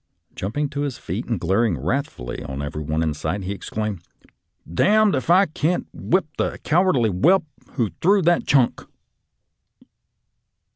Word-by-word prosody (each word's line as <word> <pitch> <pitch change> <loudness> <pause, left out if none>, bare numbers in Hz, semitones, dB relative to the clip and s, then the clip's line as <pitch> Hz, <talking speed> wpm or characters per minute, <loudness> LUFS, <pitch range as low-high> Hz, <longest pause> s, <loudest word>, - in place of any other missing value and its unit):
Jump 100 +8 -5
ing 150 0 +1
to 140 +1 -4
his 140 -4 -3
feet 95 +8 -5
and 115 -6 -1
glaring 95 +1 +1
wrathfully 75 - -3
on 70 -1 -6
every 75 +1 -4
body 80 +2 -1
in 80 -2 0
sight, 80 +7 -3
he 95 - -3
exclaimed, 105 -1 -4 0.4
" 80 - -19
D - - +2
d 215 +1 +5
if 130 - -3
I 185 +3 +6
can't 160 +1 -1
whip 185 +2 0
the - - -1
cowardly 155 - +3
whelp 165 - +3 0.3
who 115 -8 0
threw 195 +2 +4
that 175 +1 +2
chunk 135 -4 +3
115 Hz, 160 wpm, -22 LUFS, -, 0.4 s, I